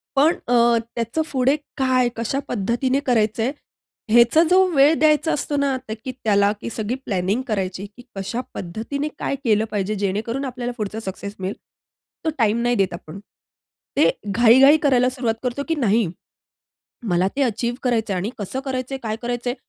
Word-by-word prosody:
पण 305 +5 +5
अ, 245 - +1 0.4
त्याचं 235 +7 -1
पुढे 265 +1 +2 0.2
काय, 255 -2 +2
कशा 235 +4 -1
पद्धतीने 245 +6 0
करायचं 225 -2 +2
आहे, 255 - +1 0.6
ह्याचा 240 +7 +6
जो 375 +1 +6
वेळ 280 +3 +6
द्यायचा 310 +1 +3
असतो 295 0 -2
ना 280 -1 +1
तर - - -2
की 255 - -2
त्याला 200 -2 +3
की - - -4
सगळी 225 +2 -3
प्लॅनिंग 195 +4 0
करायची, 195 -2 -2
की 245 - -12
कशा 200 +6 -3
पद्धतीने 225 - -4
काय - - -1
केलं 220 -2 +2
पाहिजे 205 0 -1
जेणेकरून 210 +7 -2
आपल्याला 245 -1 -4
पुढचा 215 0 -3
सक्सेस 200 0 -6
मिळेल. 190 +2 -3 0.7
तो - - +2
टाईम 230 -1 +2
नाही 240 0 +2
देत 195 -3 +1
आपण. 170 +2 -9 0.8
ते - - +5 0.2
घाई-घाई 245 +7 +6
करायला 255 -3 +4
सुरुवात 245 -3 -2
करतो, 250 +3 -2
की 325 - 0
नाही 225 - +2 1.0
मला 180 +1 +2
ते 280 - +2
अचीव्ह 240 -1 -1
करायचंय 225 -6 0
आणि 195 +5 -2
कसं 210 +6 -4
करायचंय 265 0 -3
काय 220 -1 -2
करायचंय. 245 0 -2
235 Hz, 165 wpm, -22 LUFS, 210-265 Hz, 1.0 s, ह्याचा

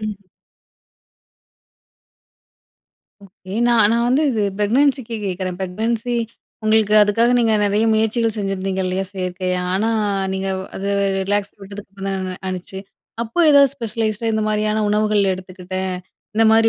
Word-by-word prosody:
ம். 205 -3 -6 3.0
ஓகே. 185 0 -13 0.2
நான் 225 -3 +5
நான் 235 0 +2
வந்து 265 +5 +3
இது 220 -4 0 0.2
ப்ரெக்னன்சிக்கு 250 +2 +1
கேட்கிறேன். 185 -1 -3
ப்ரெக்னன்சி 225 +6 -2 0.5
உங்களுக்கு 215 -1 +3
அதுக்காக 225 +3 +3
நீங்க 225 -2 +3
நிறைய 205 +2 +2
முயற்சிகள் 225 +1 +1
செஞ்சிருந்தீங்க 195 -2 -2
இல்லையா? 185 +1 -1
செயற்கையா. 185 -1 -2
ஆனா 215 +4 +1 0.4
நீங்க 190 0 -2 0.3
அத 195 - -6 0.4
ரிலாக்ஸ் 205 +1 -1
விட்டதுக்கு 200 0 -10
அப்புறம் 195 0 -6
தான் 185 -1 -4
ஆனுச்சு. 185 +1 -5 0.4
அப்போ 235 +6 -6
ஏதாவது 280 -2 +6
ஸ்பெஷலைஸ்ட்டா 225 -1 -2
இந்த 220 0 0
மாதிரியான 215 0 0
உணவுகள் 210 -2 +2
எடுத்துக்கிட்டேன். 185 0 -5 0.4
இந்த 225 +1 +3
மாதிரி 225 0 +5
210 Hz, 120 wpm, -20 LUFS, 190-225 Hz, 3.0 s, ஏதாவது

